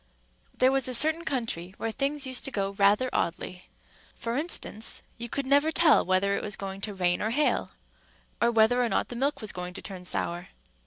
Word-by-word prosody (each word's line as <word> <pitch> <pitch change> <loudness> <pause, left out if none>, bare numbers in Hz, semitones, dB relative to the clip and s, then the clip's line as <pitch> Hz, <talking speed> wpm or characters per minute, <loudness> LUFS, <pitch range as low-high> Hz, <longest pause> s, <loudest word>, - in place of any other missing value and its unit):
There 255 +1 +4
was 270 -2 +1
a 255 - +1
certain 315 +6 +3
country 225 - -3
where 225 - -3
things 275 +3 0
used 260 -1 -2
to 270 - -2
go 195 -4 -1
rather 200 +5 +3
oddly. 180 +2 -3 0.5
For 230 0 -4
instance, 280 -7 -3 0.2
you 235 0 -5
could 280 +3 -2
never 285 +4 +3
tell 320 -1 +5
whether 185 +2 +1
it - - -2
was 210 0 -2
going 195 0 -6
to 205 0 -4
rain 175 -1 +1
or 215 - 0
hail, 290 +6 +1 0.7
or 235 - +4
whether 235 +2 +4
or 235 - 0
not - - 0
the 245 - -6
milk 275 +4 -1
was 215 - +1
going 180 0 -7
to - - -6
turn 185 -2 -8
sour. 175 0 -1
230 Hz, 205 wpm, -27 LUFS, 195-270 Hz, 0.7 s, tell